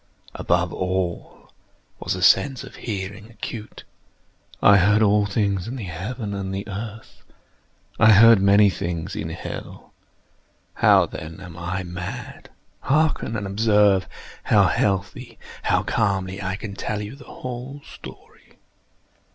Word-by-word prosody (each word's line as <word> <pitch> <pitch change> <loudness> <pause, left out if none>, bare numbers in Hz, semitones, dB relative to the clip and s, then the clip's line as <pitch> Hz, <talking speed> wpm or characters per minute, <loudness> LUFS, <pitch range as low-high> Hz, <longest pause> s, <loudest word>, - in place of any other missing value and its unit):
Above 85 0 0
all 90 -1 -3 0.5
was - - -2
the - - -4
sense 135 -2 +4
of - - -12
hearing 105 0 -6
acute. 110 0 -8 0.8
I 100 0 +6
heard 105 +3 +4
all 105 0 +3
things 100 -2 -1
in 125 - -5
the 120 - -6
heaven 100 +5 -5
and 100 -1 -4
in - - -4
the 100 +2 -5
earth. 110 +2 -8 0.8
I 110 -1 +7
heard 115 0 +7
many 100 +1 +6
things 90 +2 -4
in 105 -6 -4
hell. 80 - -8 0.8
How, - - +5
then, 80 +1 -9
am 90 -3 -10
I 90 +3 -4
mad? 90 +1 -7 0.3
Hearken! 150 -5 +1
and 105 -2 -3
observe 105 -1 +3 0.4
how - - +5
healthily—how 100 -1 -1
calmly 100 -3 -1
I 95 -1 -2
can 105 0 -7
tell 105 +2 -3
you 105 +6 -8
the 140 - -14
whole 130 +3 -7
story. - - -14
100 Hz, 135 wpm, -23 LUFS, 95-110 Hz, 0.8 s, I